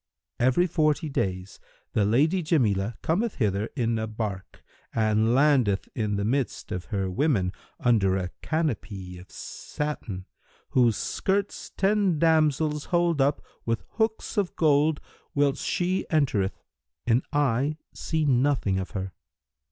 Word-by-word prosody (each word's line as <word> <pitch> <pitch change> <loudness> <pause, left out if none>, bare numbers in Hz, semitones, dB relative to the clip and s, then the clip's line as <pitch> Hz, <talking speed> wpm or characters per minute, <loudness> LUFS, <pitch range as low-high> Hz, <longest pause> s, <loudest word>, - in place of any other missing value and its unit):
Every 130 +8 +4
forty 155 -2 +1
days 95 -7 -3 0.3
the 105 - +2
Lady 150 - +3
Jamilah 115 - +1
cometh 200 +7 0
hither 105 -2 0
in 115 -4 0
a 110 - -2
bark 105 -4 -5 0.3
and 110 +1 +3
landeth 130 -8 +3
in 105 -3 -1
the 100 0 -1
midst 130 +3 -1
of 90 -1 -3
her 100 -4 -2
women, 95 - +1 0.3
under 100 -6 +3
a 90 -2 -3
canopy 105 - -3
of 90 - -14
satin, 115 -11 -5 0.5
whose 120 -4 +3
skirts 200 +1 -1
ten 195 -3 +2
damsels 155 -2 +2
hold 170 -4 +2
up 140 +2 +1 0.2
with 115 0 -1
hooks 220 0 -1
of 200 -3 0
gold, 150 -1 +3 0.4
whilst 140 -1 +2
she 185 +1 0
entereth, 120 -11 +1 0.5
and 120 +2 +3
I 145 0 +1 0.2
see 160 -1 -1
nothing 130 -7 +2
of 95 - -5
her. 95 -1 -4
130 Hz, 130 wpm, -26 LUFS, 105-155 Hz, 0.5 s, Every